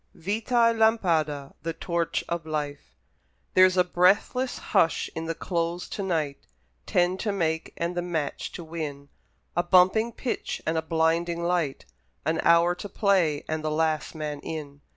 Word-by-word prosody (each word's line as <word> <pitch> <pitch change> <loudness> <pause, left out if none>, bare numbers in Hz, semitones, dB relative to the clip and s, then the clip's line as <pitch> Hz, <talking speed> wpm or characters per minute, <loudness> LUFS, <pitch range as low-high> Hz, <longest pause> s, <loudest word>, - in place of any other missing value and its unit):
Goethe 205 +6 -3
VITAÏ 230 -2 +3
LAMPADA 160 -11 +2
(The 165 +2 -3
Torch 170 0 -1
of 170 -1 -2
Life) 150 -2 -4 0.6
There's 185 0 +6
a 180 - +6
breathless 195 +8 +2 0.2
hush 165 - +3
in 160 - -4
the 165 0 -2
Close 170 0 -2
to - - -4
night 160 -7 -1 0.5
Ten 180 +1 +2
to 210 - -1
make 160 -5 -1
and 170 +1 -2
the 175 - 0
match 165 -4 -3
to 175 - -7
win 150 -4 -6 0.5
A 175 - +3
bumping 185 +6 +4
pitch 245 +1 -3
and 160 - 0
a 160 - +1
blinding 165 +1 0
light, 170 -5 -1 0.4
An 160 +2 +1
hour 170 +1 +5
to 200 +3 -8
play 185 -9 +2
and 155 0 -2
the 155 - 0
last 155 0 0
man 150 -2 -4
in. 145 -2 -7
170 Hz, 160 wpm, -26 LUFS, 155-180 Hz, 0.6 s, There's